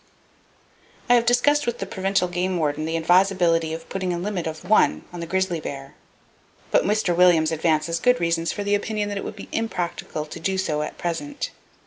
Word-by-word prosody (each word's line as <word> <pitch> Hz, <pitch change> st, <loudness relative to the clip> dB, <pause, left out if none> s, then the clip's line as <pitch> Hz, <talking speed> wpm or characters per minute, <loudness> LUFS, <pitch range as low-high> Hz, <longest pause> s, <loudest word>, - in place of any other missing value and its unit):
I -, -, +8 dB
have 235 Hz, -1 st, +3 dB
discussed 290 Hz, +4 st, +3 dB
with 240 Hz, 0 st, -1 dB
the 195 Hz, -, -4 dB
Provincial 190 Hz, -1 st, 0 dB
Game 180 Hz, +1 st, -1 dB
Warden 155 Hz, -1 st, -1 dB
the 165 Hz, +1 st, -1 dB
advisability 175 Hz, -1 st, +3 dB
of 165 Hz, +1 st, -6 dB
putting 185 Hz, -2 st, -2 dB
a 175 Hz, -, -1 dB
limit 180 Hz, -2 st, -3 dB
of 160 Hz, +3 st, -7 dB
one 130 Hz, -, +3 dB
on 175 Hz, -, -6 dB
the 170 Hz, -, -5 dB
grizzly 190 Hz, -1 st, 0 dB
bear, 135 Hz, -2 st, -7 dB, 0.8 s
but -, -, +4 dB
Mr. 205 Hz, -3 st, +1 dB
Williams 170 Hz, -3 st, +5 dB
advances 160 Hz, +1 st, +1 dB
good 250 Hz, 0 st, +3 dB
reasons 170 Hz, -1 st, 0 dB
for 205 Hz, -, -4 dB
the 205 Hz, 0 st, 0 dB
opinion 205 Hz, 0 st, -1 dB
that 205 Hz, -1 st, -3 dB
it -, -, -6 dB
would 210 Hz, -, -6 dB
be 200 Hz, -, -9 dB
impracticable 175 Hz, -8 st, -3 dB
to 155 Hz, -, -9 dB
do 190 Hz, +3 st, -1 dB
so 155 Hz, -5 st, -1 dB
at 150 Hz, -, -5 dB
present. 275 Hz, -, -4 dB
180 Hz, 195 wpm, -23 LUFS, 165-205 Hz, 0.8 s, I